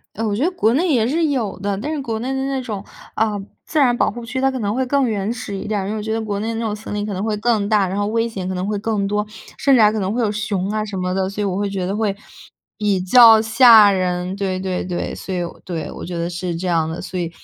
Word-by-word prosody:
呃， 225 - -2
我 205 - 0
觉 220 - -1
得 350 - +2
国 230 -11 +2
内 330 +4 +2
也 230 -4 +2
是 320 +6 +1
有 255 -9 -2
的， 200 0 -2
但 290 +9 -3
是 305 - -2
国 230 -5 -3
内 250 +4 -3
的 265 0 -2
那 270 -1 -1
种， 210 -5 -5 0.3
啊， 215 -2 0 0.3
自 315 - -1
然 250 -4 +4
保 - - +2
护 240 0 -8
区， 260 +3 -3
它 270 0 +3
可 260 - -4
能 205 -2 -1
会 260 +2 0
更 275 0 +2
原 205 -1 -1
始 215 -4 -6
一 195 - -6
点 210 -1 0
儿。 190 - -4
因 205 - -3
为 220 - -3
我 - - -4
觉 220 +1 -3
得 225 - -1
国 205 -2 -3
内 220 - -3
的 230 - -2
那 225 - -3
种 215 -2 -1
森 210 0 -7
林 205 0 -2
可 210 - -4
能 190 0 -3
会 215 0 -1
更 215 -2 +1
大， 210 -3 +3
然 190 +2 -3
后 205 - 0
危 225 +2 0
险 190 -5 -5
可 185 - -3
能 180 +1 -2
会 210 0 -1
更 210 -1 -1
多， 210 +1 0 0.3
甚 275 - +4
至 250 - +5
还 210 0 +5
可 220 - -2
能 195 -1 -1
会 240 +2 0
有 210 -2 +1
熊 205 -3 -2
啊 215 0 -1
什 205 -2 -6
么 180 0 -2
的， 190 0 0
所 200 +2 -4
以 - - 0
我 190 -2 -1
会 205 +1 -1
觉 195 -2 -3
得 195 - -2
会 210 -2 -1 0.6
比 205 -3 +1
较 225 +3 +7
吓 220 -1 +7
人。 180 -1 -1
对 195 -2 -2
对 185 -1 -2
对。 180 -1 -3
所 190 - -7
以， 180 - -1 0.2
对， 165 -5 -4
我 - - -8
觉 175 0 -5
得 170 0 -2
是 175 -1 -3
这 180 +3 -4
样 165 -3 +1
的， 160 - -5
所 185 - -4
以 170 -1 -3
210 Hz, 335 characters per minute, -20 LUFS, 190-230 Hz, 0.6 s, 较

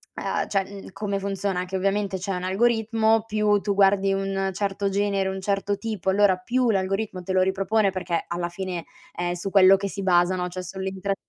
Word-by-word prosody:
ah - - -2
cioè, 195 0 -3
come 200 +2 -2
funziona 195 -2 -2
che 185 +1 -6
ovviamente 195 +1 0
c'è 195 +2 -3
un 180 - -4
algoritmo, 225 +2 +2
più 210 -1 +2
tu 200 -1 -1
guardi 195 0 +4
un 195 0 -1
certo 200 +1 -1
genere, 200 -1 0
un 190 0 -5
certo 200 +1 -1
tipo, 205 -3 -3
allora 195 -1 +4
più 240 +6 +1
l'algoritmo 195 0 -1
te 185 +1 -4
lo 185 - +4
ripropone, 195 +2 +1
perché 180 -3 -2
alla 175 0 -3
fine 180 -1 -5 0.3
è 175 0 -2
su 185 +3 -5
quello 195 -1 +7
che 195 +1 -2
si 200 - -6
basano, 180 -1 +2
cioè 185 +1 -6
sull'intrat 190 +1 -3
195 Hz, 185 wpm, -24 LUFS, 185-205 Hz, 0.3 s, quello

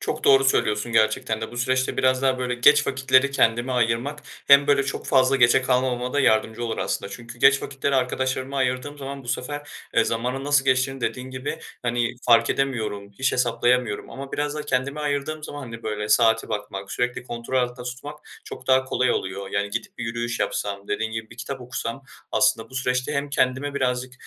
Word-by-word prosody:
Çok - - -4
doğru 135 0 +6
söylüyorsun 110 -3 +1
gerçekten 110 +1 +1
de. 110 - -5
Bu 120 - -9
süreçte 130 +1 0
biraz 130 0 +2
daha 130 -1 +2
böyle 125 -1 -1
geç 150 +5 +5
vakitleri 130 +1 +3
kendime 120 -1 +2
ayırmak 125 +5 0 0.2
hem 140 0 +7
böyle 140 -1 +4
çok 140 - -4
fazla 130 0 +4
geçe 120 +1 +5
kalmamama 125 -1 0
da 145 - +2
yardımcı 110 -1 +2
olur 115 -1 -3
aslında. 100 - -2
Çünkü 120 0 -10
geç 135 +2 +5
vakitleri 140 0 -2
arkadaşlarıma 130 +1 -1
ayırdığım 130 +3 -1
zaman 135 -1 -7
bu - - -12
sefer, 145 +4 -4 0.3
eee, - - +4
zamanın 125 +4 -2
nasıl 145 -1 +3
geçtiğini, 135 0 +1
dediğin 130 +2 -3
gibi, 130 +2 -5 0.2
hani, 120 0 0
fark 115 -1 +5
edemiyorum, 110 -7 -2
hiç 130 0 +1
hesaplayamıyorum 120 -2 +1
ama 135 0 -8
biraz 145 0 -2
da 150 - -4
kendime 140 +1 -1
ayırdığım 150 +1 -2
zaman, 145 - -7
hani, 115 -2 -9
böyle 105 -1 -3
saate 115 0 +3
bakmak, 100 -2 -5
sürekli 125 0 -1
kontrol 120 +2 -3
altında 125 0 -2
tutmak 140 +4 -7 0.3
çok 130 - -10
daha 130 0 +4
kolay 130 -1 +1
oluyor. 95 +1 -3
Yani 100 0 -1
gidip 115 +3 -5
bir 120 - -3
yürüyüş 115 +1 -3
yapsam, 100 -1 -3
dediğin 110 0 -2
gibi, 115 0 -5
bir 115 - -13
kitap 130 +2 -6
okusam 125 +1 -5 0.3
aslında 115 -3 +2
bu - - -14
süreçte 125 +2 -1
hem 140 0 -2
kendime 135 +1 0
birazcık, 125 -2 -1
125 Hz, 190 wpm, -24 LUFS, 115-135 Hz, 0.3 s, hem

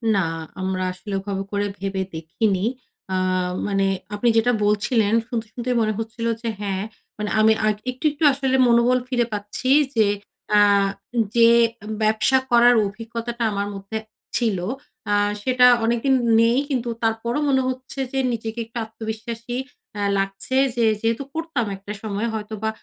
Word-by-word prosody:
না, 195 - +2 0.4
আমরা 185 0 -1
আসলে 195 +3 -8
ওভাবে 195 0 -3
করে 205 0 0
ভেবে 195 0 -2
দেখিনি। 185 +5 -1 0.5
আ - - +2 0.5
মানে 195 -1 +1 0.3
আপনি 235 +4 +2
যেটা 245 +2 +4
বলছিলেন 210 +1 +2
শুনতে, 235 -2 -3
শুনতেই 245 +1 -2
মনে 215 0 +1
হচ্ছিল 225 +1 -4 0.2
যে 230 - -2
হ্যাঁ, 195 -1 -2 0.3
মানে 210 0 -3
আমি 220 0 +6
আ - - +3 0.3
একটু, 255 +4 -9
একটু 295 +2 -6
আসলে 265 -1 0
মনোবল 240 +1 +4
ফিরে 245 -2 +1
পাচ্ছি। 210 +5 -4 0.3
যে 215 -2 +4 0.4
অ্যা 210 0 +6 0.7
যে 230 0 +7 0.5
ব্যবসা 215 +4 +3
করার 240 0 +6
অভিজ্ঞতাটা 230 +3 -5
আমার 200 0 -2
মধ্যে 195 +3 -5 0.4
ছিল, 225 -6 +1 0.5
আ - - +3 0.3
সেটা 250 +2 +4 0.2
অনেকদিন 240 +4 +2 0.3
নেই। 230 +2 +4
কিন্তু 245 -3 -1
তারপরও 225 +4 0
মনে 265 -1 +3
হচ্ছে 260 +1 -5
যে 270 - -1
নিজেকে 225 0 -4
একটু 230 +2 -10
আত্মবিশ্বাসী 225 +2 -6 0.4
আ - - -1 0.2
লাগছে। 195 +6 -2 0.2
যে 235 -1 +2 0.2
যেহেতু 230 +4 0
করতাম 320 -7 -2
একটা 195 +2 -9
সময়, 215 +1 -2
হয়তোবা 220 0 -3
225 Hz, 145 wpm, -22 LUFS, 205-240 Hz, 0.7 s, যে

